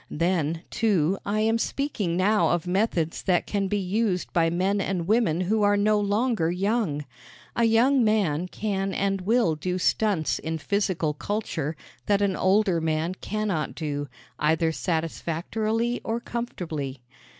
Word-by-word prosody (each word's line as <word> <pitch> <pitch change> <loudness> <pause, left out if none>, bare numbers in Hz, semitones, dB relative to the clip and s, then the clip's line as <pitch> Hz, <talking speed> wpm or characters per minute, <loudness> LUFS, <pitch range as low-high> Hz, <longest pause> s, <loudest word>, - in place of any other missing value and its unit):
Then, 165 -1 0
too, 195 -6 +1
I 210 +1 +1
am 225 +1 +2
speaking 215 -12 -1
now 210 +3 +3
of 175 0 0
methods 180 -3 0
that 180 -2 +1
can 200 -2 -1
be 205 +2 0
used 195 -1 -1
by 165 -1 +3
men 190 +4 +1
and 180 -4 -2
women 205 -6 +2
who 210 +4 +1
are 205 0 +4
no 210 +1 +3
longer 205 -3 +1
young. 180 -5 0 0.5
A 235 - +3
young 240 +4 +4
man 185 -7 +1
can 195 -1 -2
and 195 -1 0
will 215 -3 +2
do 180 +4 -2
stunts 185 -3 +1
in 160 0 -3
physical 185 -3 0
culture 160 -4 -3 0.3
that 205 0 +3
an 195 -2 +1
older 190 -2 +2
man 160 +2 0
cannot 200 -5 -2
do, 145 -2 -3 0.3
either 160 +2 +2
satisfactorily 175 - -2
or 225 +1 -1
comfortably. 160 - -5
190 Hz, 145 wpm, -26 LUFS, 165-215 Hz, 0.5 s, are